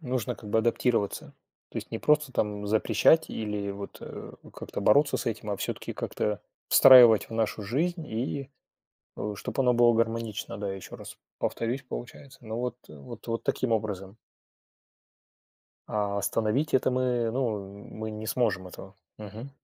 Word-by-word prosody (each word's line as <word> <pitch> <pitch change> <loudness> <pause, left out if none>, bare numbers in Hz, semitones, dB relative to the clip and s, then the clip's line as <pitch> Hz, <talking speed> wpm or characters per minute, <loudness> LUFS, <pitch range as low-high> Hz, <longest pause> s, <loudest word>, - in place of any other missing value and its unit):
нужно 125 -4 -2
как 105 - -11
бы 110 - +2
адаптироваться. 115 -2 0 0.4
То - - -10
есть - - -5
не - - -3
просто 150 -3 +2
там 105 -1 -1
запрещать 110 +9 +4
или 105 -2 -3
вот, 100 0 -8
э, - - -8 0.2
как-то - - -6
бороться 145 +7 +4
с - - -5
этим, 110 -1 -3
а 100 - -1
всё-таки - - -4
как-то 105 -2 -2 0.3
встраивать 120 -5 +8
в - - -10
нашу 110 -1 -1
жизнь, 160 - -1
и, 130 +4 -3 0.7
э, 105 0 -3
чтоб 105 - -5
оно 125 -2 +4
было 120 0 +5
гармонично, 115 -2 -1
да, 100 -1 -3
ещё 95 - -9
раз - - -10 0.2
повторюсь, 120 +4 -2
получается. 135 +2 -9
Но 110 +2 -4
вот, 125 -1 -2
э, - - -11
вот 70 - -11 0.2
таким 125 -3 -1
образом. 100 -2 -2 1.7
А 100 -1 -1
остановить 115 +9 0
это 130 - +3
мы, 125 -2 +1
ну, 105 -5 -3
мы 110 0 -5
не 110 +1 -6
сможем 105 -7 0
этого. 95 +2 -11 0.2
Мгм. 110 +5 -8
110 Hz, 155 wpm, -28 LUFS, 105-125 Hz, 1.7 s, встраивать